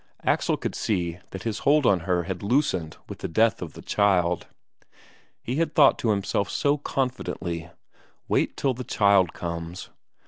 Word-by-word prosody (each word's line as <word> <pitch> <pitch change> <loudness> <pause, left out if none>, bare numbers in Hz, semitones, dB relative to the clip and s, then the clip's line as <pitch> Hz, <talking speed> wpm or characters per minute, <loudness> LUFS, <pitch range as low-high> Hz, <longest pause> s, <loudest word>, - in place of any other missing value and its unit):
Axel - - +1
could - - -4
see 90 -5 -2
that 95 0 -7
his 110 -3 -2
hold 145 0 +3
on 95 -5 +4
her 90 -1 +2
had 90 0 -5
loosened 100 - 0
with - - -8
the - - -3
death 110 +5 +2
of - - -6
the - - -11
child. 90 -4 +1 1.0
He 125 +4 -3
had 160 -1 0
thought 145 -3 +6
to 115 - 0
himself 100 -1 0
so 145 +1 +1
confidently: 105 - -3 0.6
wait - - 0
till 135 -2 +1
the 125 +1 -6
child 100 -6 +3
comes! 85 +1 -6
100 Hz, 165 wpm, -25 LUFS, 90-125 Hz, 1.0 s, thought